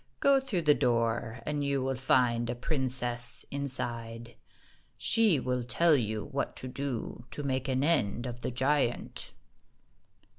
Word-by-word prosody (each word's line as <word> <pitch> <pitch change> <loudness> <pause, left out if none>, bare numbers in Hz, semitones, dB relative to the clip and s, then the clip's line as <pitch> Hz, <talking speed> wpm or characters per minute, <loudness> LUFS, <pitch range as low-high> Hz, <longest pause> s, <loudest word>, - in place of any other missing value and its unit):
Go 280 -1 +5
through 230 -11 -2
the 150 -1 +6
door, 115 -2 0
and 150 -1 -1
you 140 -2 0
will 135 0 0
find 125 -2 +2
a 120 - -2
princess 125 -3 +1
inside. 120 -4 -2 0.6
She 220 -10 +3
will 125 -1 -1
tell 160 +6 +3
you 110 -4 -2
what 140 - -3
to 130 - -6
do 125 -3 -5
to 145 - -6
make 130 -1 -1
an 130 0 0
end 125 -7 +1
of 120 -1 -6
the - - -2
giant." 130 0 -1
130 Hz, 145 wpm, -30 LUFS, 120-140 Hz, 0.6 s, the